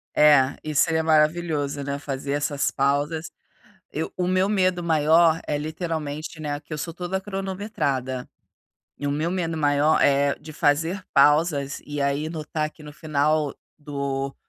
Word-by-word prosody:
É, 145 Hz, -3 st, +5 dB
isso 155 Hz, +2 st, +1 dB
aí 160 Hz, -, +1 dB
é -, -, +2 dB
maravilhoso, 155 Hz, -2 st, +1 dB
né, 140 Hz, 0 st, -3 dB
fazer 140 Hz, -1 st, -5 dB
essas 145 Hz, 0 st, 0 dB
pausas. 145 Hz, +4 st, 0 dB, 0.6 s
Eu -, -, -4 dB
o 180 Hz, -1 st, -1 dB
meu 185 Hz, +1 st, +2 dB
medo 185 Hz, -3 st, +1 dB
maior 160 Hz, 0 st, +4 dB
é 150 Hz, -, 0 dB
literalmente, 155 Hz, 0 st, -4 dB
né, 145 Hz, -2 st, -3 dB
que 150 Hz, -, -24 dB
eu 155 Hz, -, -3 dB
sou 160 Hz, +3 st, -5 dB
toda 180 Hz, +2 st, -3 dB
cronometrada. 190 Hz, -, -3 dB, 0.7 s
E 145 Hz, -, -4 dB
o -, -, +1 dB
meu 155 Hz, +4 st, -1 dB
medo 170 Hz, -3 st, -2 dB
maior, 145 Hz, 0 st, +3 dB
eh, 140 Hz, 0 st, +3 dB
de 155 Hz, +1 st, -11 dB
fazer 160 Hz, +6 st, +1 dB
pausas 145 Hz, -1 st, +3 dB
e 145 Hz, -1 st, -3 dB
aí 140 Hz, +2 st, 0 dB
notar 155 Hz, -1 st, -3 dB
que 155 Hz, -, -17 dB
no 150 Hz, 0 st, -10 dB
final 150 Hz, -1 st, 0 dB, 0.2 s
do 140 Hz, -2 st, -3 dB
150 Hz, 155 wpm, -24 LUFS, 145-165 Hz, 0.7 s, É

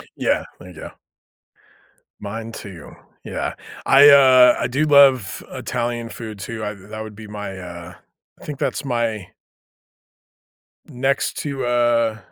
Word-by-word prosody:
Yeah. -, -, 0 dB, 0.2 s
There 90 Hz, -, -12 dB
you 90 Hz, -, -14 dB
go. 80 Hz, -, -9 dB, 1.3 s
Mine 110 Hz, +2 st, -7 dB
too. 95 Hz, -8 st, -10 dB, 0.3 s
Yeah. -, -, -4 dB, 0.3 s
I, 140 Hz, +2 st, +7 dB
uh, 130 Hz, -3 st, +7 dB
I -, -, 0 dB
do 140 Hz, +4 st, -1 dB
love 135 Hz, -8 st, +4 dB
Italian 120 Hz, -1 st, -4 dB
food 110 Hz, -3 st, -8 dB
too. 110 Hz, +2 st, -6 dB
I've 105 Hz, -1 st, -5 dB
that 110 Hz, 0 st, -7 dB
would 110 Hz, -1 st, -9 dB
be 110 Hz, 0 st, -11 dB
my 105 Hz, -2 st, -7 dB
uh, 90 Hz, -1 st, -9 dB, 0.5 s
I -, -, -12 dB
think 145 Hz, -2 st, -7 dB
that's 135 Hz, -, -2 dB
my 115 Hz, -7 st, -2 dB, 1.6 s
next 135 Hz, +2 st, -1 dB
to, 140 Hz, -3 st, -4 dB
uh, 120 Hz, -2 st, +1 dB
115 Hz, 135 wpm, -20 LUFS, 105-130 Hz, 1.6 s, I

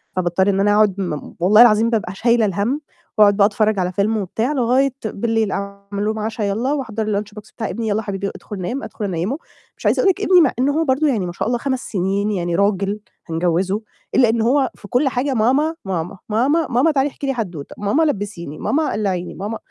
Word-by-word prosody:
فباضطر 185 Hz, +2 st, +1 dB
إن 195 Hz, 0 st, +1 dB
أنا 205 Hz, +1 st, +3 dB
أقعد 210 Hz, -3 st, +4 dB
م 155 Hz, -6 st, -4 dB
والله 210 Hz, +6 st, +6 dB
العظيم 225 Hz, -1 st, +6 dB
بابقى 205 Hz, -5 st, -1 dB
شايلة 235 Hz, 0 st, +3 dB
الهَم، 210 Hz, -, -1 dB, 0.4 s
وأقعد 205 Hz, -1 st, +6 dB
بقى 200 Hz, -, +6 dB
أتفرّج 215 Hz, -1 st, +1 dB
على 180 Hz, 0 st, 0 dB
فيلم 205 Hz, +4 st, 0 dB
وبتاع 220 Hz, +7 st, -1 dB
لغاية 260 Hz, +1 st, +2 dB
بالليل 220 Hz, 0 st, 0 dB
أعمل 200 Hz, +1 st, -4 dB
لهم 220 Hz, 0 st, -1 dB
عشا، 220 Hz, +1 st, -3 dB
يالّا، 225 Hz, +8 st, 0 dB
وأحضّر 225 Hz, -6 st, -3 dB, 0.2 s
الlunch 210 Hz, 0 st, -12 dB
box 210 Hz, -, -17 dB
بتاع 225 Hz, -, -3 dB
ابني، 230 Hz, -1 st, -3 dB
"يالّا 215 Hz, +1 st, 0 dB
حبيبي 200 Hz, -1 st, -3 dB
أدخل 205 Hz, -3 st, -8 dB
نام." 245 Hz, +10 st, -3 dB
أدخل 210 Hz, -, -5 dB
أنيّمه، 190 Hz, -, -2 dB, 0.4 s
مش -, -, -13 dB
عايزة -, -, +3 dB
أقول 390 Hz, -, +4 dB
لِك 400 Hz, -, -6 dB
ابني 365 Hz, -3 st, +5 dB
مع 290 Hz, -, +4 dB
إنه 275 Hz, +3 st, +3 dB
هو -, -, +2 dB
برضه 275 Hz, +3 st, +2 dB
يعني 220 Hz, -9 st, 0 dB
ما 175 Hz, -, -4 dB
شاء 175 Hz, -, -3 dB
الله 240 Hz, +1 st, +1 dB
5 260 Hz, -1 st, -1 dB
سنين 200 Hz, +1 st, -1 dB
يعني 175 Hz, -3 st, -1 dB
راجل 200 Hz, +1 st, +1 dB, 0.3 s
هنجوّزه، 180 Hz, +5 st, 0 dB, 0.3 s
إلا 245 Hz, -4 st, +5 dB
إن 230 Hz, 0 st, +1 dB
هو 260 Hz, +4 st, +2 dB
في 205 Hz, -, -13 dB
كلّ 260 Hz, +6 st, +2 dB
حاجة 260 Hz, +2 st, -1 dB
"ماما، 270 Hz, +8 st, +2 dB
ماما، 180 Hz, 0 st, -3 dB
ماما، 275 Hz, +9 st, +2 dB
ماما 255 Hz, +7 st, +3 dB
تعالي 280 Hz, -1 st, +1 dB
احكي 275 Hz, -, -6 dB
لي 270 Hz, -, +1 dB
حدّوتة، 180 Hz, -, -5 dB
ماما 210 Hz, +10 st, +1 dB
لبّسيني، 200 Hz, -, -3 dB
ماما 310 Hz, +1 st, 0 dB
قلّعيني 190 Hz, -4 st, -2 dB
ماما" 210 Hz, +4 st, -4 dB
215 Hz, 215 wpm, -20 LUFS, 195-250 Hz, 0.4 s, والله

